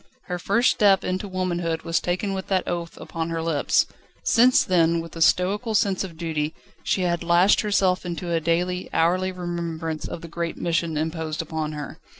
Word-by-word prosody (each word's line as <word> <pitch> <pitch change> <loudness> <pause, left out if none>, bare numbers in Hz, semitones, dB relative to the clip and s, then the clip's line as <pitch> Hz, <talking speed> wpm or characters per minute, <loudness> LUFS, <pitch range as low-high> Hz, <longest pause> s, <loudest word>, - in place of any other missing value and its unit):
Her 180 -1 -4
first 230 +8 +3
step 200 -2 +4
into 185 +3 -2
womanhood 175 -3 -2
was 165 0 +1
taken 185 +3 -2
with 190 -1 -4
that 190 -2 0
oath 170 -1 -4
upon 165 0 -4
her 165 0 -2
lips; 160 -3 +2 0.4
since 250 +2 +5
then, 170 -2 +3
with 165 0 -8
a 165 - -6
stoical 205 +7 +2
sense 200 -3 +2
of 170 -4 -8
duty, 160 -2 -2 0.3
she 185 - 0
had 175 -1 0
lashed 175 +3 +4
herself 195 -3 +2
into 175 0 -4
a 165 - +2
daily, 175 +3 -1
hourly 185 +3 +2
remembrance 170 -3 -4
of 165 - -6
the 170 - -8
great 170 0 -4
mission 165 -2 -1
imposed 160 +1 -2
upon 155 -1 -3
her. 150 -3 -7
170 Hz, 180 wpm, -24 LUFS, 165-185 Hz, 0.4 s, since